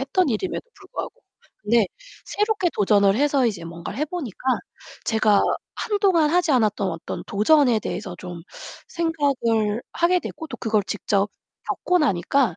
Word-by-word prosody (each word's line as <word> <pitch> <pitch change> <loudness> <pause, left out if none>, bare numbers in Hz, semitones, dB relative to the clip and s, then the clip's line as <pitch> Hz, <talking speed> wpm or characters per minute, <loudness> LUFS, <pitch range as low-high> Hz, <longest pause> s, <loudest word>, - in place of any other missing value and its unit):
했던 280 +5 +1
일임에도 260 - -2
불구하고. 390 -2 -6 0.5
근데 220 0 +3 0.4
새롭게 415 -3 0
도전을 200 -1 +4
해서 275 -1 +3
이제 195 -7 -3
뭔가를 170 +7 -7
해 300 - +1
보니까 295 - -5 0.7
제가 215 -2 +3 0.3
한동안 385 -7 +2
하지 355 -1 +2
않았던 215 -5 +2
어떤 165 -1 -6
도전에 245 +3 +4
대해서 200 -4 -5
좀 175 -2 -7 0.5
생각을 260 -10 0
하게 355 +1 +3
됐고 320 - -7
또 - - -7
그걸 215 -3 +1
직접 200 -1 0 0.4
겪고 360 - +1
나니까 250 - +2
240 Hz, 310 characters per minute, -23 LUFS, 205-320 Hz, 0.7 s, 도전을